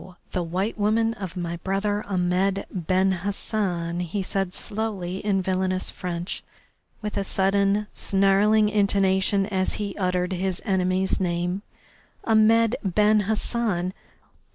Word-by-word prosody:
the 180 Hz, -, -1 dB
white 185 Hz, +6 st, -2 dB
woman 225 Hz, +2 st, +2 dB
of 190 Hz, -4 st, -7 dB
my 170 Hz, -1 st, -3 dB
brother 200 Hz, +3 st, -1 dB
Ahmed 190 Hz, +1 st, +1 dB
Ben 185 Hz, +2 st, +1 dB
Hassan," 185 Hz, -4 st, -1 dB
he 180 Hz, +3 st, -2 dB
said 195 Hz, -1 st, -1 dB
slowly, 200 Hz, -4 st, -4 dB
in 195 Hz, -2 st, 0 dB
villainous 185 Hz, 0 st, -1 dB
French, 175 Hz, 0 st, -4 dB, 0.6 s
with 210 Hz, -1 st, -3 dB
a 200 Hz, -, 0 dB
sudden, 200 Hz, +2 st, +2 dB
snarling 200 Hz, +2 st, +3 dB
intonation 195 Hz, -1 st, +2 dB
as 190 Hz, -2 st, -1 dB
he 200 Hz, -2 st, -3 dB
uttered 180 Hz, -1 st, 0 dB
his 185 Hz, 0 st, -1 dB
enemy's 190 Hz, -2 st, +1 dB
name. 180 Hz, +1 st, -1 dB, 0.6 s
"Ahmed 225 Hz, +1 st, +4 dB
Ben 210 Hz, +2 st, +3 dB
Hassan! 210 Hz, -5 st, 0 dB
195 Hz, 120 wpm, -25 LUFS, 185-210 Hz, 0.6 s, Ahmed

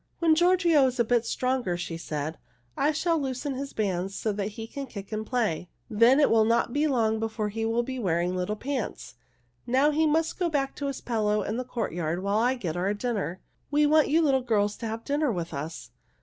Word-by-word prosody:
"When 330 Hz, -2 st, +4 dB
Giorgio 340 Hz, -4 st, +4 dB
is 255 Hz, 0 st, -4 dB
a -, -, +5 dB
bit 235 Hz, 0 st, +1 dB
stronger," 255 Hz, -8 st, -1 dB
she 175 Hz, -1 st, -4 dB
said, 155 Hz, -1 st, -4 dB, 0.4 s
"I 295 Hz, +2 st, +2 dB
shall 330 Hz, +2 st, +1 dB
loosen 270 Hz, +1 st, -3 dB
his 275 Hz, +1 st, -5 dB
bands 195 Hz, -2 st, -2 dB
so 220 Hz, -, -1 dB
that 205 Hz, 0 st, -3 dB
he 225 Hz, -, -5 dB
can 275 Hz, +4 st, -6 dB
kick 200 Hz, -3 st, -9 dB
and 215 Hz, 0 st, -2 dB
play. 220 Hz, -8 st, -1 dB, 0.2 s
Then 230 Hz, +6 st, +5 dB
it 290 Hz, -, +4 dB
will 225 Hz, -1 st, +5 dB
not 230 Hz, +1 st, +1 dB
be 295 Hz, +2 st, +2 dB
long 225 Hz, -5 st, +1 dB
before 220 Hz, -1 st, -2 dB
he 225 Hz, +2 st, -3 dB
will 230 Hz, +1 st, +1 dB
be 260 Hz, +1 st, -5 dB
wearing 180 Hz, -3 st, 0 dB
little 185 Hz, +3 st, -1 dB
pants. 255 Hz, +1 st, -4 dB, 0.5 s
Now 265 Hz, +5 st, +3 dB
he 315 Hz, +1 st, +2 dB
must 320 Hz, +3 st, 0 dB
go 350 Hz, -2 st, +1 dB
back 275 Hz, -3 st, -1 dB
to 285 Hz, -, -3 dB
his 275 Hz, -, -4 dB
pillow 210 Hz, -3 st, 0 dB
in 215 Hz, +4 st, -3 dB
the 255 Hz, -, -2 dB
courtyard 180 Hz, -8 st, -3 dB
while 200 Hz, +2 st, +1 dB
I 250 Hz, +3 st, +2 dB
get 175 Hz, -10 st, -4 dB
our 190 Hz, +4 st, 0 dB
dinner. 205 Hz, -5 st, -3 dB, 0.3 s
We 295 Hz, +1 st, +3 dB
want 305 Hz, +1 st, +4 dB
you 325 Hz, +3 st, +3 dB
little 270 Hz, -3 st, +3 dB
girls 210 Hz, -4 st, +1 dB
to 230 Hz, -, -5 dB
have 225 Hz, +1 st, -5 dB
dinner 290 Hz, -1 st, +1 dB
with 170 Hz, -5 st, -4 dB
us." 155 Hz, +3 st, -6 dB
230 Hz, 220 wpm, -27 LUFS, 205-280 Hz, 0.5 s, a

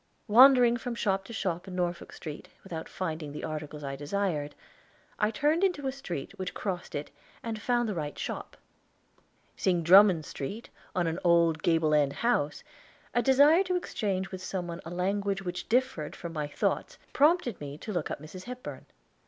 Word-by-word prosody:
Wandering 245 Hz, +1 st, +7 dB
from 240 Hz, 0 st, -4 dB
shop 195 Hz, -4 st, 0 dB
to -, -, -10 dB
shop 185 Hz, -6 st, -2 dB
in 185 Hz, -, -6 dB
Norfolk 175 Hz, -1 st, -2 dB
Street, 155 Hz, -2 st, -8 dB
without 165 Hz, -4 st, -6 dB
finding 160 Hz, -5 st, -4 dB
the 150 Hz, -, -7 dB
articles 150 Hz, -1 st, -5 dB
I 135 Hz, -1 st, -4 dB
desired, 150 Hz, 0 st, -2 dB, 0.6 s
I 210 Hz, -, +3 dB
turned 300 Hz, -, +1 dB
into 355 Hz, -8 st, +1 dB
a 265 Hz, -, 0 dB
street 175 Hz, -, -6 dB
which 185 Hz, -1 st, -4 dB
crossed 185 Hz, -4 st, -4 dB
it, 145 Hz, -, -4 dB, 0.3 s
and 225 Hz, -2 st, -4 dB
found 240 Hz, 0 st, +1 dB
the 210 Hz, -, -1 dB
right 150 Hz, -4 st, -4 dB
shop. -, -, -5 dB, 1.0 s
Seeing 175 Hz, -3 st, +1 dB
Drummond 180 Hz, -2 st, +7 dB
Street 200 Hz, -, -6 dB, 0.2 s
on 180 Hz, -1 st, +2 dB
an 165 Hz, +2 st, -1 dB
old 170 Hz, -2 st, +4 dB
gable 160 Hz, -2 st, +2 dB
end 145 Hz, -2 st, +3 dB
house, 150 Hz, -11 st, 0 dB, 0.5 s
a 240 Hz, -, +3 dB
desire 285 Hz, +7 st, +6 dB
to 365 Hz, 0 st, 0 dB
exchange 195 Hz, -, -2 dB
with 185 Hz, -1 st, -6 dB
some 185 Hz, -1 st, -3 dB
one 170 Hz, -1 st, -6 dB
a -, -, -6 dB
language 195 Hz, +2 st, -1 dB
which 180 Hz, -1 st, -5 dB
differed 225 Hz, -, 0 dB
from 170 Hz, -1 st, -7 dB
my 150 Hz, -2 st, -2 dB
thoughts 145 Hz, -, -1 dB, 0.2 s
prompted 295 Hz, -, +3 dB
me 145 Hz, 0 st, -6 dB
to 210 Hz, +6 st, -6 dB
look 175 Hz, -4 st, -2 dB
up -, -, -4 dB
Mrs. 170 Hz, +5 st, -10 dB
Hepburn. 250 Hz, 0 st, -8 dB
185 Hz, 175 wpm, -29 LUFS, 160-230 Hz, 1.0 s, Wandering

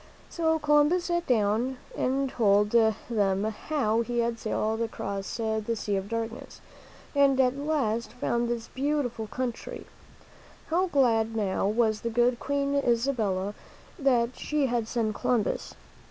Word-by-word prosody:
So 320 Hz, -1 st, +1 dB
Columbus 295 Hz, +4 st, +3 dB
sat 345 Hz, -1 st, -1 dB
down 235 Hz, +2 st, +1 dB, 0.2 s
and 270 Hz, +2 st, 0 dB
told 210 Hz, -5 st, +3 dB
them 215 Hz, -3 st, +2 dB
how 220 Hz, +1 st, 0 dB
he 240 Hz, +1 st, -3 dB
had 235 Hz, -1 st, 0 dB
sailed 220 Hz, +1 st, -1 dB
across 200 Hz, -3 st, -4 dB
the 220 Hz, 0 st, -1 dB
Sea 210 Hz, -2 st, -2 dB
of 195 Hz, +1 st, -3 dB
Darkness 230 Hz, 0 st, -5 dB, 0.5 s
and 280 Hz, -2 st, +4 dB
at 255 Hz, 0 st, +3 dB
last 260 Hz, -7 st, -1 dB
found 240 Hz, -1 st, -1 dB
this 235 Hz, -1 st, -3 dB
beautiful 260 Hz, -5 st, -1 dB
country. 245 Hz, +1 st, -5 dB, 0.8 s
How 360 Hz, +4 st, +2 dB
glad 225 Hz, -7 st, +2 dB
now 195 Hz, -3 st, 0 dB
was 215 Hz, 0 st, +1 dB
the 235 Hz, -, -2 dB
good 240 Hz, +1 st, +2 dB
Queen 280 Hz, 0 st, -1 dB
Isabella 230 Hz, -7 st, 0 dB, 0.5 s
that 250 Hz, -3 st, +2 dB
she 300 Hz, -2 st, 0 dB
had 240 Hz, -3 st, -1 dB
sent 225 Hz, -2 st, -1 dB
Columbus! 230 Hz, +1 st, -1 dB
235 Hz, 135 wpm, -27 LUFS, 220-275 Hz, 0.8 s, and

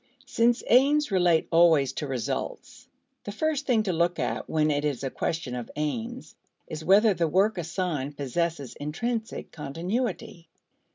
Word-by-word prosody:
Since 235 Hz, -1 st, +2 dB
aims 280 Hz, +3 st, +4 dB
relate 175 Hz, -4 st, +3 dB
always 165 Hz, -5 st, +4 dB
to 150 Hz, -, -4 dB
results, 125 Hz, -4 st, -4 dB, 0.4 s
the 205 Hz, -, -5 dB
first 295 Hz, +5 st, -1 dB
thing 230 Hz, -4 st, +3 dB
to 190 Hz, -4 st, -1 dB
look 170 Hz, +1 st, +1 dB
to -, -, -2 dB
when 155 Hz, -1 st, +1 dB
it 145 Hz, 0 st, 0 dB
is 140 Hz, -4 st, -2 dB
a 135 Hz, -, -2 dB
question 160 Hz, -6 st, -3 dB
of 125 Hz, -2 st, -5 dB
aims, 225 Hz, -, -4 dB, 0.3 s
is 155 Hz, 0 st, -7 dB
whether 205 Hz, +4 st, +5 dB
the 170 Hz, -2 st, 0 dB
work 195 Hz, +7 st, +2 dB
assigned 160 Hz, -5 st, -3 dB
possesses 145 Hz, 0 st, -2 dB
intrinsic 220 Hz, +10 st, -4 dB
continuity. 180 Hz, -, -4 dB
170 Hz, 150 wpm, -26 LUFS, 150-220 Hz, 0.4 s, whether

